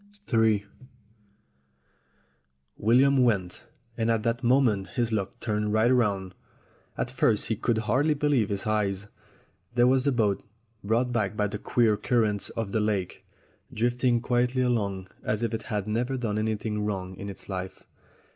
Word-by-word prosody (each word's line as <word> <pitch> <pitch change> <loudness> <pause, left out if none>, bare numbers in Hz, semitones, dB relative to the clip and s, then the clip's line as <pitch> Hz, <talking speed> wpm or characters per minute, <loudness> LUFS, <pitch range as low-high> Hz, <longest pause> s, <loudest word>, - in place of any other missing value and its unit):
in 110 -3 +3 2.2
WILLIAM 130 +4 +4
went, 100 -7 0 0.3
and 115 0 0
at 115 -1 +1
that 115 0 -1
moment 120 -6 +3
his 120 -2 +1
luck 100 -3 -2
turned 105 -1 -1
right 110 +3 +4
round. 100 -6 0 0.6
At 120 - -2
first 115 -5 +1
he 110 - +1
could 115 +1 0
hardly 130 +8 +1
believe 140 -7 +1
his 100 -1 -3
eyes. 105 -1 -1 0.7
There 120 0 +5
was 130 +1 +3
the 140 - +2
boat, 110 -6 +1 0.4
brought 115 +4 +1
back 110 -2 -1
by 105 - +2
the 105 0 -4
queer 110 -2 +2
cur 120 +1 +1
rents 105 -2 -2
of 110 -4 -4
the 110 - +1
lake, 105 -4 -2 0.5
drifting 120 +1 +1
quietly 125 +1 +1
along 100 -6 -1
as 105 +2 -2
if 115 -1 -1
it 115 - -2
had 105 -2 -2
never 120 +5 -1
done 110 -4 -2
anything 110 -1 -2
wrong 95 -3 -3
in 100 - -6
its 100 - -9
life. 95 -1 -6
110 Hz, 155 wpm, -27 LUFS, 105-120 Hz, 2.2 s, There